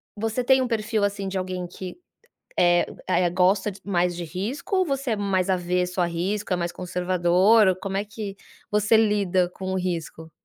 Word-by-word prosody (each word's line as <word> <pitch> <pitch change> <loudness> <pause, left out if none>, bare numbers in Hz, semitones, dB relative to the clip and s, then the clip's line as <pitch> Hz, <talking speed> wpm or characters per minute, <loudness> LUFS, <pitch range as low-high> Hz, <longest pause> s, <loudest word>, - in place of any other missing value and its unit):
você 225 +3 -2
tem 265 +1 +4
um 255 - 0
perfil 220 -2 -1
assim 200 -1 -1
de 190 0 -3
alguém 185 -1 -3
que, 180 +1 -8 0.6
eh 175 0 +4 0.2
eh, 180 -1 +2
gosta 190 +3 +2
mais 175 -2 +1
de 175 - -5
risco 225 - -3
ou 370 - +3
você 275 -3 -2
é 220 - +2
mais 195 -3 0
avesso 180 0 0
a - - +3
risco, 190 +4 -3
é - - +3
mais 175 0 -2
conservador 180 +4 +3
ou 185 - +3
como 195 +1 -4
é 200 - 0
que 205 -1 -7 0.4
você 210 +2 +4
lida 200 -4 +2
com 190 0 -5
o - - 0
risco? 165 -3 -4
190 Hz, 190 wpm, -24 LUFS, 180-210 Hz, 0.6 s, tem